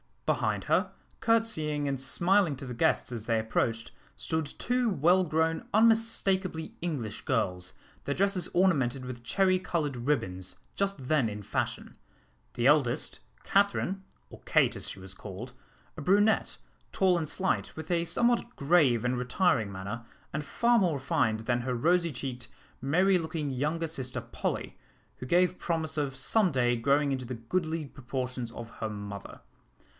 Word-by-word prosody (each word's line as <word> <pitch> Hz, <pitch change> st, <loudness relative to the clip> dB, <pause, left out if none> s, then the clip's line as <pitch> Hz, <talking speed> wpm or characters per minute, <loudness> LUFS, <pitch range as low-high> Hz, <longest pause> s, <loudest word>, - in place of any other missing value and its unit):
Behind -, -, 0 dB
her, -, -, +1 dB, 0.3 s
courtesying 160 Hz, -11 st, +1 dB
and 135 Hz, -1 st, -2 dB
smiling 175 Hz, +4 st, +3 dB
to 135 Hz, +1 st, -8 dB
the 125 Hz, -, -5 dB
guests 115 Hz, -, +1 dB
as 115 Hz, -3 st, -5 dB
they 115 Hz, -1 st, +1 dB
approached, 115 Hz, +1 st, -1 dB, 0.2 s
stood 160 Hz, -1 st, -2 dB
two 245 Hz, -, 0 dB
well 180 Hz, +1 st, +3 dB
grown 160 Hz, 0 st, 0 dB
unmistakably 205 Hz, -7 st, +2 dB
English 140 Hz, -11 st, -3 dB
girls, 95 Hz, -, -1 dB, 0.3 s
their 140 Hz, -, -1 dB
dresses 195 Hz, -1 st, +1 dB
ornamented 135 Hz, -9 st, +2 dB
with 125 Hz, -2 st, -7 dB
cherry 185 Hz, +8 st, +2 dB
coloured 165 Hz, -6 st, -2 dB
ribbons, 95 Hz, -9 st, -2 dB, 0.2 s
just 195 Hz, -10 st, -2 dB
then 150 Hz, -7 st, +3 dB
in 105 Hz, 0 st, -6 dB
fashion: -, -, -3 dB, 0.6 s
the 120 Hz, -, -1 dB
eldest, 140 Hz, -2 st, +3 dB, 0.2 s
Catherine, 195 Hz, -1 st, +1 dB, 0.3 s
or -, -, -11 dB
Kate, -, -, +3 dB
as -, -, -3 dB
she -, -, -8 dB
was 95 Hz, 0 st, -9 dB
called, 105 Hz, +6 st, -8 dB, 0.4 s
a -, -, -5 dB
brunette, 205 Hz, +7 st, +3 dB, 0.3 s
tall 185 Hz, -2 st, +3 dB
and 160 Hz, -2 st, -2 dB
slight, 190 Hz, 0 st, 0 dB
with 160 Hz, +2 st, -6 dB
a 170 Hz, -1 st, +2 dB
somewhat 240 Hz, +4 st, +1 dB
grave 140 Hz, -6 st, +3 dB
and 125 Hz, +1 st, +1 dB
retiring 125 Hz, -, +1 dB
manner, 100 Hz, +5 st, -6 dB, 0.3 s
and 150 Hz, +1 st, -2 dB
far 235 Hz, +8 st, +3 dB
more 175 Hz, -6 st, +2 dB
refined 115 Hz, -5 st, 0 dB
than 120 Hz, +1 st, 0 dB
her 125 Hz, 0 st, -2 dB
rosy 170 Hz, +6 st, +2 dB
cheeked, 125 Hz, -2 st, -5 dB, 0.3 s
merry 180 Hz, +8 st, +3 dB
looking 160 Hz, -3 st, -3 dB
younger 150 Hz, +6 st, -1 dB
sister 130 Hz, -5 st, -4 dB
Polly, -, -, -4 dB, 0.4 s
who 125 Hz, -, -7 dB
gave 180 Hz, +4 st, +3 dB
promise 160 Hz, -2 st, -2 dB
of 140 Hz, -3 st, -1 dB
some 185 Hz, +8 st, +2 dB
day 120 Hz, -3 st, +2 dB
growing 140 Hz, +4 st, +2 dB
into 130 Hz, -2 st, -2 dB
the 125 Hz, -, -5 dB
goodly 160 Hz, +7 st, -2 dB
proportions 125 Hz, -2 st, -5 dB
of 115 Hz, -1 st, -8 dB
her 110 Hz, -, -2 dB
mother. 100 Hz, -1 st, -7 dB
145 Hz, 155 wpm, -29 LUFS, 120-180 Hz, 0.6 s, smiling